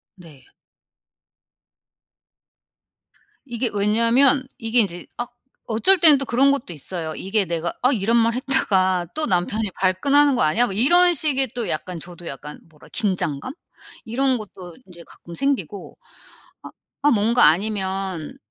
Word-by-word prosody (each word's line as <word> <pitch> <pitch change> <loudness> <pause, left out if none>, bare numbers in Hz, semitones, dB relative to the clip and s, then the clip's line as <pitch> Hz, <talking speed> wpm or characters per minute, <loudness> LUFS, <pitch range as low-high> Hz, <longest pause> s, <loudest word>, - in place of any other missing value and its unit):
네. 165 -8 -17 3.0
이게 240 -1 -3
왜냐하면 230 +6 +2
이게 225 +1 +1
인제 175 -4 -4
아 240 - -3 0.4
어쩔 240 - +3
때는 315 -4 +8
또 275 - -3
그런 265 +4 +3
것도 260 -10 -3
있어요. 160 +1 -6
이게 195 +1 0
내가 170 -1 -3
'아 255 - +3
이런 230 -1 +1
말 230 0 +2
했다가 190 -9 0
또 310 - -1
남편이 205 +3 -1
발끈하는 275 +10 +2
거 - - -1
아니야?' 155 +11 +2
뭐 200 - -5
이런 350 - +4
식의 270 -4 0
또 240 -3 -4
약간 170 +2 -5
저도 175 +1 -12
약간 150 +2 -9
뭐라 150 -2 -19
긴장감? 190 - -2 0.5
이런 260 +3 0
것도 185 -5 -11
인제 175 -2 -14
가끔 170 - -13
생기고 210 - -3 0.7
아 - - -10 0.3
아 295 - +4
뭔가 230 +2 +3
아니면 190 -1 -1
215 Hz, 265 characters per minute, -21 LUFS, 180-255 Hz, 3.0 s, 때는